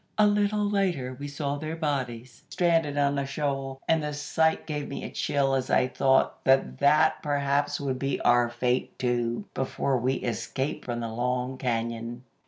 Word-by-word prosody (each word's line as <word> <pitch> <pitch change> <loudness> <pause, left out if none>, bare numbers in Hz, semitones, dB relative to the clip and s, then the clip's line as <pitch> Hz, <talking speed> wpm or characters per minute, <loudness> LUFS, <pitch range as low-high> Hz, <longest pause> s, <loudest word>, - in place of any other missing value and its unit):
A 215 - +6
little 205 0 +2
later 180 -11 0
we 145 - -5
saw 145 0 -3
their 155 +2 -4
bodies 130 -6 -3
stranded 165 -5 +1
on 140 0 +2
a 140 - -1
shoal, 135 -2 -3
and 160 -1 +3
the 150 -1 -3
sight 160 +2 +1
gave 150 -2 -3
me 140 - -6
a - - -6
chill 135 -1 0
as 130 -1 0
I 125 - +3
thought 135 +1 +2
that 135 0 +2
that 155 +2 +4
perhaps 145 -1 0
would 130 -2 -2
be 135 0 -1
our 120 0 +4
fate, 125 +1 -1
too, 120 -2 -1
before 135 0 -1
we 130 +3 +1
escaped 130 +3 -3
from 120 -1 -3
the 115 - -3
Long 125 +2 -1
Cañon. 115 0 -2
135 Hz, 175 wpm, -27 LUFS, 125-150 Hz, -, A